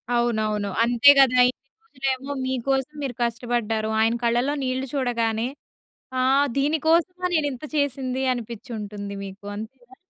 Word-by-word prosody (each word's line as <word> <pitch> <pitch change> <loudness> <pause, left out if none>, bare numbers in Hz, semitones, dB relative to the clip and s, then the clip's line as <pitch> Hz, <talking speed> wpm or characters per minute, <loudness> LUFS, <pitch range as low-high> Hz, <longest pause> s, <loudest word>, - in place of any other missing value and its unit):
అవునవును. 215 -4 0
అంతే 240 +4 +7
గదా! 255 -2 +5
ఇన్ని 270 +1 -11
రోజులేమో 270 - -3
మీకోసం 265 +2 -1
మీరు 260 -3 -3
కష్టబడ్డారు. 235 -2 -1
ఆయన 225 +1 +3
కళ్ళలో 240 +5 +2
నీళ్ళు 260 +1 -2
చూడగానే, 235 -4 0 0.7
ఆ - - +2 0.4
దీని 295 +3 +1
కోసమా 360 +2 +2
నేనింత 290 -5 -1
చేసింది 265 -2 -1
అనిపిచ్చుంటుంది 210 -3 -6
మీకు 195 +1 -11
అంతేనా? 245 +4 -10
245 Hz, 120 wpm, -24 LUFS, 225-270 Hz, 0.7 s, అంతే